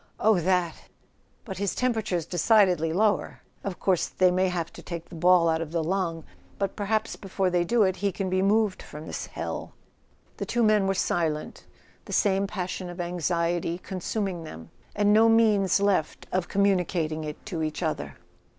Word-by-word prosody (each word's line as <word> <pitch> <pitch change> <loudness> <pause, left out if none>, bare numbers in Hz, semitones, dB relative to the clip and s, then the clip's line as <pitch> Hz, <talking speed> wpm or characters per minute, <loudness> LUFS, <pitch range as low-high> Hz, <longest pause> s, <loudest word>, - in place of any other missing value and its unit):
" - - -38
Oh, 215 -4 +4
that! 175 -1 +1 0.7
But 190 -5 -6
his 200 -2 -1
temperature's 220 -9 0
decidedly 180 -2 +3
lower. 205 +5 +1 0.2
Of 195 -3 -5
course 185 -3 +1
they 185 -1 +3
may 185 +1 +2
have 170 -2 -3
to - - -10
take 170 -2 -7
the - - -13
ball 175 +1 +4
out 160 0 +1
of 160 -2 -5
the 165 -1 0
lung; 170 -2 -1 0.3
but 195 -1 -2
perhaps 215 +2 -1
before 190 -1 -2
they 175 -1 +2
do 230 +5 +3
it 190 -1 +1
he 200 +2 0
can 190 +1 -3
be 185 0 +1
moved 205 0 +2
from 150 +1 -10
this - - -5
hell." - - -5 0.6
The - - -3
two 240 -1 +1
men 215 -3 +4
were 195 - +1
silent, 160 -4 -2 0.4
the - - -7
same 195 -1 +2
passion 185 -2 -4
of 175 +1 -9
anxiety 175 -1 -1
consuming 185 -1 -3
them, 80 - -10 0.2
and 205 0 +3
no 225 +1 +6
means 215 -4 +4
left 200 -6 0
of 185 -1 0
communicating 180 -5 +1
it 150 -1 -7
to 180 -6 -4
each 155 -1 -3
other. - - -3
185 Hz, 180 wpm, -26 LUFS, 170-200 Hz, 0.7 s, no